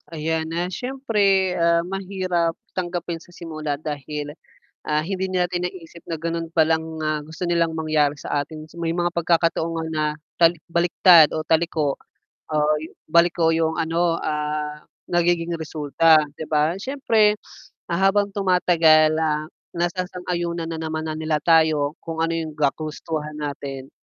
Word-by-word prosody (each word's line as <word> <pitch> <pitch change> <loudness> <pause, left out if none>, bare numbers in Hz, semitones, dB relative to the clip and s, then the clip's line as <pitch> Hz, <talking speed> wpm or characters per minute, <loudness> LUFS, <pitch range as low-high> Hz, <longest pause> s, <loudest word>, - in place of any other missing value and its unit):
Ayan 160 0 -2
na, 170 +2 -1
siyempre, 200 -4 +1
ah, 170 0 +3
mahirap 185 -3 -1 0.2
tanggapin 175 -2 -3
sa - - -18
simula 155 -4 -5
dahil, 150 0 -5 0.5
ah, 150 0 +1
hindi 190 +4 -3
natin 180 -1 0
naisip 170 -2 -8
na 165 -2 -5
ganun 165 0 -3
palang, 160 0 +1
ah, 155 -1 -1
gusto 160 +3 -5
nilang 170 -1 +2
mangyari 155 -2 +1
sa 145 -1 -1
atin 155 +1 -10
may 165 -1 -1
mga 175 0 0
pagkakataon 165 -1 +1
nga 165 -1 -3
na 155 -1 -1 0.3
tal 170 -1 +5 0.2
baliktad 170 -1 +6
o 155 - -1
taliko 160 -3 +1 0.5
o 155 - -3 0.5
baliko 170 0 +3
yung 160 0 0
ano, 165 +1 +1
ah, 150 -1 -3 0.2
nagiging 175 -1 +1
resulta, 155 +1 +3 0.2
'di 155 - -7
ba? 155 +1 +2
Siyempre, 225 -5 +2 0.5
ah, 170 - 0
habang 200 +1 +3
tumatagal, 170 -5 +4
ah, 155 -1 0 0.3
nasasang-yunan 175 -1 -2
na 165 -1 -4
naman 160 0 -3
na 155 - -3
nila 155 -1 0
tayo 155 -3 +3
kung 165 -1 -6
ano 165 0 0
yung 160 -2 -4
ga 145 -2 +3
kagustuhan 155 -1 -5
natin, 140 -2 -5
165 Hz, 140 wpm, -23 LUFS, 155-175 Hz, 0.5 s, baliktad